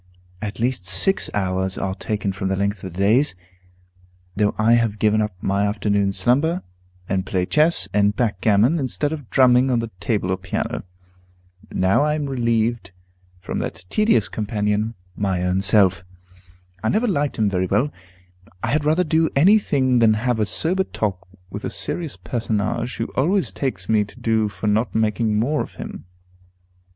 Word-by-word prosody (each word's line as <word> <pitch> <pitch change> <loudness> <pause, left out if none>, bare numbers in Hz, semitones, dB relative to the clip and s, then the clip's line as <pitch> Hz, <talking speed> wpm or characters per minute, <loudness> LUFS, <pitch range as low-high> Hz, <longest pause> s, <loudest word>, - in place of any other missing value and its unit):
At 105 +1 -5
least 120 -4 0
six 100 - +2
hours 95 -1 -1
are 95 -1 -2
taken 105 0 -3
from 95 0 -3
the 95 - 0
length 100 0 -2
of 95 - -6
the 85 - -12
days, 110 +6 +3 1.0
though 105 0 +1
I 110 +2 +4
have 115 -3 +2
given 110 0 +2
up 105 -3 -2
my 100 +1 +1
afternoon 100 -1 0
slumber, 145 - +1 0.4
and 95 -1 0
play 90 -1 -1
chess 155 - +2
and 105 0 +2
backgammon 110 - +2
instead 145 +3 -1
of 145 -7 -8
drumming 130 0 +4
on 125 - +2
the 115 -1 -3
table 100 -2 -1
or 95 - 0
piano. 95 -1 -4 0.9
Now 95 +11 +2
am 150 0 0
I - - -5
relieved 115 -5 0 0.5
from - - -4
that 85 +3 -5
tedious 215 +1 +3
companion, 105 +1 -1 0.2
my 95 -3 -1
own 90 +1 +1
self. 95 -3 +3 0.8
I 110 - 0
never 225 +4 +1
liked 145 -8 0
him 110 - +2
very 95 -2 0
well; 140 +10 +1 0.7
I - - 0
had 150 +1 +1
rather 155 +4 +2
do 160 -1 +2
any 190 +10 +6
thing 130 -9 +1
than 110 -2 +5
have 120 +1 0
a 105 - +1
sober 185 - 0
talk 95 - -3 0.2
with 105 +2 -6
a - - -2
serious 165 -5 -3
personage, 115 0 -2
who 115 - -2
always 185 +8 +1
takes 105 -10 -3
me 110 -2 +3
to 105 +5 -15
do 110 -2 +1
for 105 - -7
not 105 +3 +1
making 110 0 +1
more 145 +7 +1
of - - -7
him. - - -8
110 Hz, 170 wpm, -21 LUFS, 100-130 Hz, 1.0 s, any